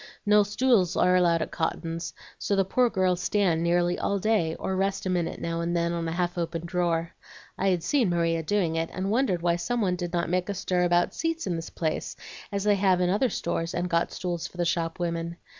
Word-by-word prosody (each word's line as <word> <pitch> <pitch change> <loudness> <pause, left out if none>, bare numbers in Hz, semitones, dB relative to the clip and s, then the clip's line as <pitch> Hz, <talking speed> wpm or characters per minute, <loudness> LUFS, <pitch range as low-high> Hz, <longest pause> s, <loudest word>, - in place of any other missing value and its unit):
No 210 0 +6
stools 205 -3 +2
are 180 0 +4
allowed 170 -2 +3
at - - -8
Cotton's, 165 0 -3 0.2
so 200 - 0
the 195 -1 +2
poor 245 +5 +2
girls 185 -3 +1
stand 180 -5 +1
nearly 175 +1 +1
all 200 - 0
day, 195 -6 +1
or 190 - -3
rest 195 +1 -1
a 185 - 0
minute 175 -2 -1
now 165 0 -2
and 170 +1 -1
then 170 0 0
on 170 -1 -2
a - - -2
half 175 +1 -1
opened 165 0 -3
drawer. 170 -2 0 0.4
I'd 185 -3 +1
seen 255 -9 +2
Maria 165 -1 +1
doing 170 -1 0
it, 165 0 -1
and 190 +2 -2
wondered 215 -8 +1
why 170 -1 +2
some 240 +8 -2
one 185 -5 +1
did 175 -1 -4
not 170 -1 0
make 180 +2 -1
a 200 - -2
stir 180 -1 0
about 175 0 +2
seats 330 0 -2
in 175 - -1
this 165 0 -5
place, 160 -2 -3 0.4
as 200 -1 -2
they 205 -1 +3
have 190 -2 +3
in 180 0 +2
other 220 +6 +2
stores 170 -3 -2
and 175 0 -1
got 170 0 +1
stools 175 -2 -3
for 180 - -16
the 175 - 0
shop 165 -1 -1
women. 170 -1 -3
175 Hz, 225 wpm, -27 LUFS, 170-195 Hz, 0.4 s, No